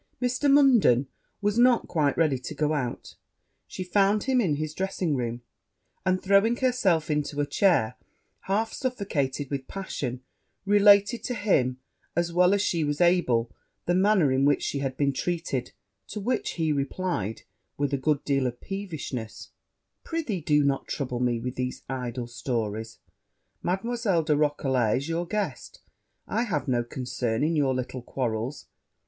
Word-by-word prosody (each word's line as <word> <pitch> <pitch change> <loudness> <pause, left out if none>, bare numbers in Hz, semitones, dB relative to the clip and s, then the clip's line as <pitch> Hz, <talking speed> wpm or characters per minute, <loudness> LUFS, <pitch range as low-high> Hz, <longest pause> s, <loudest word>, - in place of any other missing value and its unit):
Mr. 255 +3 +1
Munden 245 - +5 0.4
was 205 +3 +1
not 245 -1 +4
quite 150 -5 +1
ready 150 -6 +2
to 120 - -7
go 155 0 +1
out 125 -5 -3 0.5
she 185 - -5
found 200 +3 +2
him 260 -1 +2
in 165 -9 +1
his 155 +1 -3
dressing 185 -3 -1
room; 120 -1 -3 0.6
and, 185 -1 +1
throwing 200 +4 +4
herself 205 - +1
into 150 -1 -1
a 145 - +2
chair, 145 - +2 0.5
half 215 +3 0
suffocated 150 - -2
with 135 -2 -3
passion, 130 -10 -5 0.4
related 205 +2 +5
to 245 - -2
him, 140 - +1 0.4
as 170 0 0
well 180 +3 +5
as 200 - +1
she 170 -5 0
was 145 0 -1
able, 150 -10 +3 0.3
the 175 - +1
manner 190 -5 +4
in 130 +1 +2
which 145 +1 +3
she 140 - -2
had 135 -1 -3
been 140 -1 +1
treated; 160 -5 -2 0.4
to - - -5
which 240 +4 -1
he 160 -2 0
replied, 140 - -2 0.3
with 145 0 -1
a - - +2
good 140 +1 0
deal 135 -2 +1
of 120 0 -5
peevishness, 160 - -6 0.5
'Pr'ythee, 300 - -3
do 150 -1 +3
not 140 -1 0
trouble 125 -4 -3
me 120 -2 +1
with 125 +2 -4
these 125 0 -4
idle 125 -2 -4
stories; 115 -2 -3 0.6
Mademoiselle 195 -1 0
de 155 -1 +2
Roquelair 135 -6 +1
is 140 - -4
your 170 +1 -2
guest 195 -9 -4 0.5
I 220 - 0
have 150 - -2
no 120 -2 +1
concern 120 -1 -2
in 160 +2 +1
your 135 -4 +2
little 130 0 -4
quarrels.' 120 +1 -3
150 Hz, 155 wpm, -26 LUFS, 130-195 Hz, 0.6 s, Munden